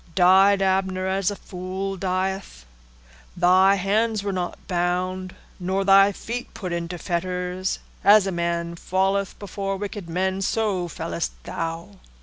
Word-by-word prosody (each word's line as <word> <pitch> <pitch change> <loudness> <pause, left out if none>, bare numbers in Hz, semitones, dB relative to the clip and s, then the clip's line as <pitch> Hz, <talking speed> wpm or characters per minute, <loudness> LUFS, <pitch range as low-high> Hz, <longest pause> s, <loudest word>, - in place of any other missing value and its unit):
Died 195 +2 +5
Abner 190 -1 +1
as 190 0 +1
a 205 - -4
fool 190 +1 -5
dieth? 185 - -3 0.7
Thy 185 +2 +5
hands 210 +2 +1
were 200 -1 -2
not 180 -1 -3
bound, 185 +1 -1 0.2
nor 190 +2 -1
thy 195 +1 +7
feet 235 +5 -6
put 180 -4 -4
into 170 +1 -3
fetters: 180 +2 -2 0.3
as 205 0 +7
a 195 - -1
man 170 -1 -2
falleth 195 +3 0
before 195 -1 -4
wicked 200 -3 -6
men, 190 +3 -1
so 195 -3 0
fellest - - -4
thou. 165 +4 -5
190 Hz, 130 wpm, -24 LUFS, 180-195 Hz, 0.7 s, thy